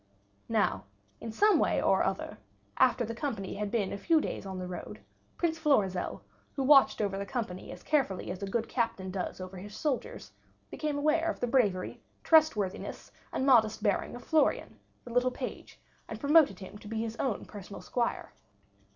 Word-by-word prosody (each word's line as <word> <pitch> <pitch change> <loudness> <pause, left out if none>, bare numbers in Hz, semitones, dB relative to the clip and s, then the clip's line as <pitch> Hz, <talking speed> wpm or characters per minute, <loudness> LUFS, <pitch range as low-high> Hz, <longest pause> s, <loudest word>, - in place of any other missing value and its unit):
Now 220 -2 +1 0.3
in 225 - -6
some 420 - +4
way - - +2
or - - +3
other, - - -2 0.4
after 250 -2 +4
the 230 - -4
company 230 -6 -4
had 210 0 -3
been 205 -3 -1
a 200 - -5
few 325 +8 +3
days 200 - -4
on 190 -1 -5
the 185 - -4
road, 170 - -7 0.4
Prince 325 -1 0
Florizel, 205 - +1 0.3
who 275 - -1
watched 275 -4 +6
over 195 -2 -1
the 200 - -3
company 205 -7 -4
as - - -10
carefully 270 -12 0
as 185 - -7
a 200 - -3
good 230 +2 -1
captain 230 -6 -2
does 185 0 -4
over 185 0 -7
his 205 +3 -9
soldiers, 290 -5 -3 0.4
became 300 -2 -2
aware 310 +3 +2
of - - -3
the - - 0
bravery, 220 -8 +1 0.2
trustworthiness, 310 - +2 0.2
and 265 - -1
modest 220 -5 +4
bearing 205 +2 0
of 245 - -9
Florian, 315 -2 +1 0.2
the 240 - -9
little 245 +1 +3
page, 250 - -7 0.3
and - - -7
promoted 290 - +5
him 195 +2 -10
to 210 - -12
be 220 +1 -2
his 225 0 -4
own 245 -7 -2
personal 200 -1 -9
squire. 240 -2 -2
230 Hz, 180 wpm, -30 LUFS, 195-275 Hz, 0.4 s, watched